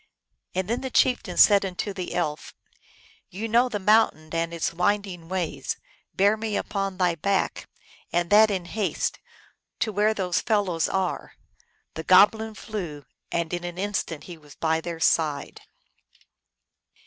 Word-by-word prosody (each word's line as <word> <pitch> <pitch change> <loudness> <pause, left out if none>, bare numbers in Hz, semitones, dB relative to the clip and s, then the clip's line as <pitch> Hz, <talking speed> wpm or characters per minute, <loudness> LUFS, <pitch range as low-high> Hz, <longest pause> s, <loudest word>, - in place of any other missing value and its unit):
And 185 0 -1
then 235 +3 -1
the 265 - -4
chieftain 250 0 +1
said 200 -2 +7
unto 195 +2 -3
the 185 -2 -5
elf, 155 -4 -3 0.4
" - - -28 0.3
You 210 +5 -5
know 240 +3 +3
the 215 - -2
mountain 200 -6 +2
and 165 0 -1
its 170 0 -2
winding 180 -2 -1
ways: 185 -4 -3 0.4
bear 200 +2 +4
me 220 -1 -2
upon 195 -2 -3
thy 180 -2 +2
back, 195 +4 -1 0.4
and 175 +2 0
that 215 +1 +7
in 190 -4 -2
haste, 205 +2 -2 0.6
to 220 - -1
where 210 +2 +2
those 180 -3 0
fel 210 -2 +2
lows 165 -4 -1
are! 190 -2 -2 0.3
" - - -43
The 160 - -6
goblin 215 +4 +5
flew, 175 -10 -6 0.3
and 170 0 -2
in 175 0 -2
an 175 0 -6
instant 190 -5 -3
he 175 -3 -10
was 145 -2 -16
by 160 0 0
their 170 -1 -6
side. 155 -3 0
185 Hz, 160 wpm, -25 LUFS, 170-210 Hz, 0.6 s, said